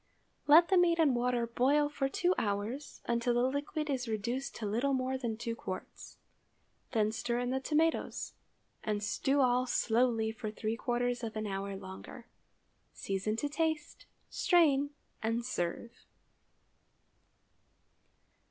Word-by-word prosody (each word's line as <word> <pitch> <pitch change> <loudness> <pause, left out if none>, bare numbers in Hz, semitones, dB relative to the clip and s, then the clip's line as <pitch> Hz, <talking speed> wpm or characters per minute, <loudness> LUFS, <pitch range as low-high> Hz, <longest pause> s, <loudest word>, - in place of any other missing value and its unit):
Let 325 +4 +8
the 380 -2 +5
meat 340 -1 +4
and 300 -6 +4
water 240 0 +1
boil 270 +5 +2
for 280 -2 -2
two 355 +6 +2
hours, 215 +7 -3
until 235 0 +1
the 240 - +3
liquid 285 +4 -1
is 260 -4 -2
reduced 235 +5 -3
to 220 - -5
little 240 +7 +1
more 260 0 -1
than 235 -4 -3
two 230 0 -3
quarts. 185 -4 -8 0.7
Then 215 -3 +2
stir 235 +2 -2
in 245 0 -1
the 265 - 0
tomatoes, 315 +4 0 0.5
and 210 -1 -1
stew 270 +7 +1
all 250 0 +3
slowly 230 -2 +2
for 220 -1 -5
three 215 +1 -3
quarters 245 +1 -1
of 225 -1 -4
an 215 0 -2
hour 195 0 -3
longer. 190 +5 -10 0.7
Season 195 +2 -2
to 260 +6 -1
taste, 310 +1 -2 0.2
strain, 290 -6 +3 0.3
and 230 +1 -1
serve. 230 0 -3
245 Hz, 135 wpm, -32 LUFS, 220-280 Hz, 0.7 s, Let